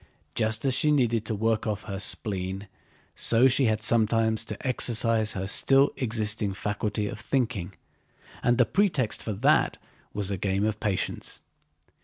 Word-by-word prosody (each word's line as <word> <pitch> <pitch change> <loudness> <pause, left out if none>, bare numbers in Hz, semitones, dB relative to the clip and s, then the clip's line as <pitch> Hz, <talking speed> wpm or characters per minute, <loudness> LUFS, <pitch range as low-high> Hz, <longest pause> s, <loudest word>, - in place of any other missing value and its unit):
Just 110 +1 -1
as 135 - +2
she 150 +4 +2
needed 120 -6 +1
to 110 - -2
work 110 +1 0
off 105 -2 -3
her 100 -3 -5
spleen 95 -1 -3 0.5
so 120 +3 +4
she 135 +1 +3
had 110 -1 0
sometimes 110 -1 +2
to 105 +5 -6
exercise 115 -3 +2
her 95 0 -3
still 135 +7 +3
existing 110 -4 -2
faculty 105 +1 -2
of 105 - -6
thinking—and 120 0 -3
the 125 - +5
pretext 155 - 0
for 110 - -4
that 95 - +2 0.3
was 100 -1 -3
a 100 - -2
game 100 +2 0
of 110 -1 -2
patience. 100 -3 -3
110 Hz, 150 wpm, -26 LUFS, 105-120 Hz, 0.5 s, the